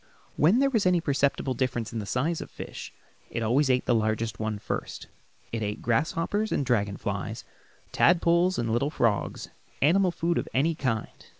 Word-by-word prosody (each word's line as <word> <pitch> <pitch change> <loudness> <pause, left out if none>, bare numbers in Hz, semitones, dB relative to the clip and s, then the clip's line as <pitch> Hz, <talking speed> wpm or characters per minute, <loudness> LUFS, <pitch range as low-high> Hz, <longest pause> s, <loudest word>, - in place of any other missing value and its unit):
When 170 +10 +4
there 275 +1 +3
was 220 -7 +2
any 180 -1 +4
perceptible 140 -3 0
difference 120 -3 -2
in 115 - -2
the 105 - -6
size 155 +9 -1
of - - -6
the - - -30
fish - - -7 0.4
it 115 - -3
always 130 +6 +2
ate 125 -1 +2
the 120 - +2
largest 110 0 0
one 110 -1 -2
first. - - -5 0.5
It 115 - -3
ate 105 0 -3
grasshoppers 165 - 0
and 140 - 0
dragon 105 -5 0
flies, - - -4 0.5
tadpoles, 175 +1 +3
and 115 -1 -1
little 120 +5 +1
frogs 115 -8 -1 0.3
animal 180 +6 +4
food 170 0 0
of - - -5
any 155 +6 +3
kind. 125 -8 -3
135 Hz, 180 wpm, -27 LUFS, 115-170 Hz, 0.5 s, When